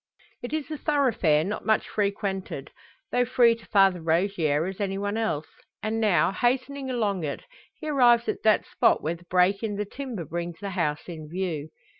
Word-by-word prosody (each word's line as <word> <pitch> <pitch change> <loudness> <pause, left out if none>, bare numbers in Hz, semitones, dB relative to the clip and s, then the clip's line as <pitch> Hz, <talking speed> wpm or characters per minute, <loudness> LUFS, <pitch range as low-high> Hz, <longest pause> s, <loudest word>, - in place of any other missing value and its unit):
It 245 - -6
is 310 0 -3
a 305 - -4
thoroughfare 230 - +2
not 205 +5 -4
much 220 0 +2
frequented, 200 -7 -2 0.4
though 245 - +3
free 240 -1 +4
to 230 0 -12
Father 195 -3 +4
Rogier 165 -2 +1
as 190 +2 -5
any 195 -1 -1
one 205 +1 -2
else; 220 -10 -1 0.4
and, 220 +1 -1
now 210 -4 +3
hastening 260 +5 -1
along 210 -8 -1
it, 145 - -4 0.3
he 310 - -8
arrives 240 -5 +4
at - - -2
that 215 -1 +3
spot - - +2
where 160 - 0
the 170 +1 -13
break 180 +2 +2
in 215 -3 -2
the 210 +1 -2
timber 240 - -6
brings 170 +2 -4
the 200 0 -5
house 150 -5 -1
in 160 -3 -8
view. 165 -4 -3
200 Hz, 185 wpm, -26 LUFS, 170-235 Hz, 0.4 s, free